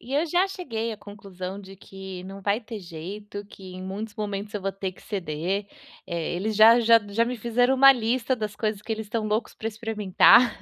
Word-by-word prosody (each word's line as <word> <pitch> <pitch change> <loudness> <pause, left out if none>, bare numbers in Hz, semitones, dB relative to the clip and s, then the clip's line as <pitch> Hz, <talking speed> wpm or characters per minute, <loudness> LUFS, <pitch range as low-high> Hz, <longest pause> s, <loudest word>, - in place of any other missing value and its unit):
E 260 +3 -6
eu 300 - +2
já 355 +4 +2
cheguei 230 - -4
à - - -7
conclusão 195 -2 -8
de 195 -1 -12
que 190 -1 -9
não 195 +1 -9
vai 200 +3 0
ter 225 -2 -8
jeito, 200 +4 -8
que 190 -2 -12
em 185 - -7
muitos 205 +3 -6
momentos 210 -1 -4
eu 205 - -3
vou 195 - -1
ter 195 -1 -5
que - - -19
ceder, 185 +1 -3 0.4
eh, 170 0 -3
eles 215 +4 -2
já 225 +2 +8
já 230 0 +6
já 220 +3 +2
me 245 +1 -3
fizeram 240 +3 +2
uma 275 +1 +8
lista 245 +1 0
das 215 -3 -4
coisas 215 -1 -2
que 220 - -3
eles 220 -1 -4
estão 220 0 -2
loucos 215 +2 -1
para 220 - -6
experimentar. 220 +1 +4
210 Hz, 215 wpm, -25 LUFS, 195-230 Hz, 0.4 s, já